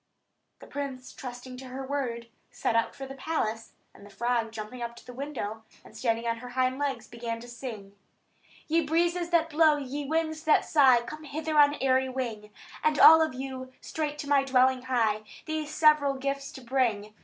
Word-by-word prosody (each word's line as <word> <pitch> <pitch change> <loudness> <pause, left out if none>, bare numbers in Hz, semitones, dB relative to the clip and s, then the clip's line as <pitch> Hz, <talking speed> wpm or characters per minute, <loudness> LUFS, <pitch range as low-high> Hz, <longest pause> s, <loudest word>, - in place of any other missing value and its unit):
The - - -10
prince, 270 -3 -6
trusting 250 0 -8
to 260 - -9
her 260 +1 -6
word, 255 -4 -3 0.2
set 230 - -1
out 230 0 +1
for 270 - -7
the 270 - -8
palace; 245 -6 -3 0.2
and - - -16
the 205 - -13
frog 235 +1 -1
jumped 215 0 -7
up 235 0 -4
to - - -15
the 250 - -10
window, 245 -5 -5 0.2
and - - -15
standing 230 -1 -1
on 230 0 0
her 250 +2 -9
hind 255 +1 0
legs, 270 -6 -2
began 230 -1 -5
to 240 - -11
sing: 230 -5 -8 0.7
"Ye 330 +2 +3
breezes 340 +3 +1
that 335 -1 +2
blow, 310 -1 +5
ye 285 +1 -4
winds 315 0 -1
that 310 - +4
sigh, 265 -6 +5
Come 305 +6 -9
hither 310 +2 -3
on 290 -1 +6
airy 260 -1 +2
wing; 235 -5 -4 0.3
And 305 -1 +2
all 320 +2 +9
of 315 -5 0
you 260 0 -6
straight 300 -2 -4
to 290 - -6
my 280 -1 +4
dwelling 260 -1 +3
hie, 230 -5 +1 0.2
These 315 -2 -3
several 300 -3 +4
gifts 275 +1 -3
to 265 - -10
bring. 230 -5 0
260 Hz, 190 wpm, -28 LUFS, 235-295 Hz, 0.7 s, all